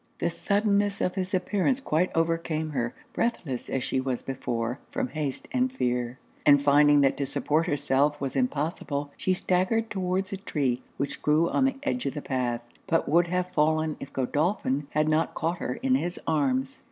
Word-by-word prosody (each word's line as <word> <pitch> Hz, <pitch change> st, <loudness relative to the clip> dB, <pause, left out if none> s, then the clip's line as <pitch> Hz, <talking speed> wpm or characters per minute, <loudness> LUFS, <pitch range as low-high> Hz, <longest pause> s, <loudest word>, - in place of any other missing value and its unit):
The 170 Hz, -, 0 dB
suddenness 205 Hz, +1 st, +1 dB
of 180 Hz, -, 0 dB
his 185 Hz, -1 st, -3 dB
appearance 205 Hz, +7 st, +1 dB
quite 180 Hz, -, +1 dB
overcame 165 Hz, -1 st, 0 dB
her, 120 Hz, -4 st, -2 dB, 0.2 s
breathless 160 Hz, -, -2 dB
as 135 Hz, -, -1 dB
she 130 Hz, -, 0 dB
was 130 Hz, -2 st, -2 dB
before 120 Hz, -1 st, -3 dB
from 265 Hz, -2 st, -2 dB
haste 150 Hz, -, -4 dB
and 255 Hz, -2 st, +1 dB
fear; 125 Hz, -, -1 dB, 0.3 s
and 145 Hz, -1 st, +7 dB
finding 145 Hz, +1 st, +5 dB
that 135 Hz, -, +3 dB
to 140 Hz, -1 st, -1 dB
support 155 Hz, +4 st, 0 dB
herself 145 Hz, -1 st, +1 dB
was 135 Hz, -2 st, -3 dB
impossible, 145 Hz, +1 st, -1 dB
she 185 Hz, -, 0 dB
staggered 190 Hz, +6 st, +1 dB
towards 190 Hz, 0 st, -1 dB
a -, -, -2 dB
tree 135 Hz, -9 st, -1 dB, 0.2 s
which 140 Hz, -, -3 dB
grew 155 Hz, +3 st, +3 dB
on 265 Hz, -, +3 dB
the 270 Hz, -, +1 dB
edge 255 Hz, -3 st, -1 dB
of 135 Hz, -, -3 dB
the 150 Hz, -, -3 dB
path, 125 Hz, -3 st, -1 dB, 0.3 s
but 165 Hz, -, +1 dB
would 170 Hz, +4 st, +4 dB
have 180 Hz, +1 st, -1 dB
fallen 155 Hz, 0 st, +2 dB
if 135 Hz, -, -8 dB
Godolphin 145 Hz, -, 0 dB
had 155 Hz, 0 st, +1 dB
not 155 Hz, +1 st, +1 dB
caught 170 Hz, +2 st, -1 dB
her -, -, -2 dB
in 265 Hz, -1 st, +3 dB
his 175 Hz, -9 st, 0 dB
arms. 135 Hz, -4 st, 0 dB
155 Hz, 180 wpm, -27 LUFS, 135-185 Hz, 0.3 s, and